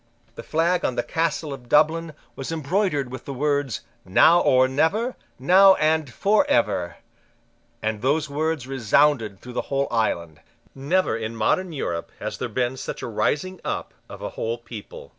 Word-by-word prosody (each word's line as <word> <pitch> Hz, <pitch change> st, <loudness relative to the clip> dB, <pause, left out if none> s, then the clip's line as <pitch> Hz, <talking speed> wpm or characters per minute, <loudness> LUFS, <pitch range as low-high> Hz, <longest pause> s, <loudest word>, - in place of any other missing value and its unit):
The -, -, -8 dB
flag 170 Hz, +3 st, 0 dB
on 125 Hz, -, 0 dB
the 120 Hz, -, 0 dB
Castle 160 Hz, -2 st, -1 dB
of 125 Hz, -3 st, -11 dB
Dublin 160 Hz, +2 st, +3 dB, 0.2 s
was 135 Hz, +3 st, -5 dB
embroidered 160 Hz, -3 st, -1 dB
with 130 Hz, -, -8 dB
the 140 Hz, -, -6 dB
words, 145 Hz, -2 st, -1 dB, 0.2 s
"Now 160 Hz, -, +5 dB
or 130 Hz, 0 st, +4 dB
never: 175 Hz, -, 0 dB, 0.2 s
now 190 Hz, +7 st, +6 dB
and 155 Hz, -3 st, +1 dB
for 205 Hz, -, +3 dB
ever:" 95 Hz, -7 st, +1 dB, 0.9 s
and 110 Hz, -1 st, -2 dB
those 145 Hz, +4 st, +1 dB
words 155 Hz, -1 st, -2 dB
resounded 130 Hz, -4 st, +2 dB
through 125 Hz, -, -10 dB
the -, -, -1 dB
whole 140 Hz, 0 st, 0 dB
island, 85 Hz, -9 st, -1 dB, 0.3 s
Never 160 Hz, +8 st, 0 dB
in 115 Hz, 0 st, -4 dB
modern 175 Hz, +12 st, 0 dB
Europe 85 Hz, -, -4 dB
has -, -, -5 dB
there 125 Hz, -, -3 dB
been 125 Hz, +3 st, -1 dB
such -, -, -6 dB
a -, -, -3 dB
rising 160 Hz, -, -1 dB
up -, -, -4 dB, 0.2 s
of -, -, -10 dB
a -, -, -3 dB
whole 115 Hz, +1 st, -3 dB
people. 115 Hz, -3 st, -10 dB
140 Hz, 165 wpm, -23 LUFS, 120-160 Hz, 0.9 s, now